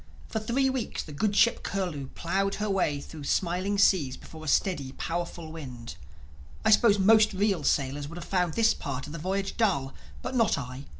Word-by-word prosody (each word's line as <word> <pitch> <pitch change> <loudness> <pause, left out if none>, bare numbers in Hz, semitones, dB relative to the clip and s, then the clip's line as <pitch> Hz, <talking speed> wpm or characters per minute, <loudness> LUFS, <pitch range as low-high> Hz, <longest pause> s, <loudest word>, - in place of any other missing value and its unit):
For 220 - -1
three 235 +5 +1
weeks 260 -4 -2
the 155 - -11
good 200 +8 0
ship 235 +2 +4
Curlew 175 -9 -3
plowed 195 +3 0
her 210 -1 -2
way 165 -7 +1
through 145 +1 -9
smiling 185 +5 0
seas 150 -10 +3
before 160 -1 -12
a - - -7
steady 145 -5 +1
powerful 170 -1 -4
wind. 130 -7 -8 0.7
I 220 - +5
suppose 210 -1 +6
most 215 +2 +5
real 195 -4 +1
sailors 140 +1 0
would 165 +3 -9
have 175 - -7
found 180 -4 0
this 225 -1 +4
part 140 -1 -5
of 150 - -9
the 165 - -6
voyage 195 +4 -2
dull. 160 - +1 0.3
But - - -4
not 230 -3 +3
I. 130 0 -6
180 Hz, 190 wpm, -28 LUFS, 145-205 Hz, 0.7 s, suppose